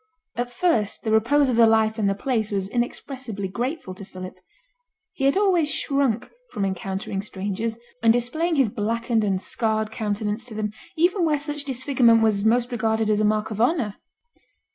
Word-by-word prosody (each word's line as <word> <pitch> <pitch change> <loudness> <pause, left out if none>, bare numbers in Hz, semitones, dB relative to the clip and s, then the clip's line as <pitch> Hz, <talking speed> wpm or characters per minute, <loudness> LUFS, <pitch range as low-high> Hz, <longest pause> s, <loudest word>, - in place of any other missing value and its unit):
At 245 +1 -2
first 240 - 0
the 220 - -1
repose 260 +7 +4
of 245 -3 0
the 230 -1 +7
life 220 0 +2
and 200 -2 +2
the 195 - 0
place 220 -1 -1
was 195 -2 -1
inexpressibly 240 -2 -3
grateful 240 - -4
to 195 - -10
Philip. 185 -1 -8 0.8
He 270 - -2
had 275 +6 +3
always 365 -7 +3
shrunk 275 -5 0 0.2
from 200 -3 -2
encountering 195 +1 -3
strangers, 205 +3 -4 0.2
and 225 0 +5
displaying 315 +9 0
his 270 -6 +3
blackened 230 +2 0
and 195 -2 +1
scarred 220 +1 -1
countenance 210 +1 -2
to 230 -3 -8
them, 210 -1 -2 0.3
even 355 +3 +3
where 310 -2 +2
such 295 0 -3
disfigurement 250 -4 +3
was 210 -2 +2
most 240 +3 +2
regarded 220 -2 +1
as 210 - +2
a 215 - +2
mark 215 +1 0
of 215 +1 -2
honour. 240 - +1
225 Hz, 175 wpm, -24 LUFS, 210-260 Hz, 0.8 s, the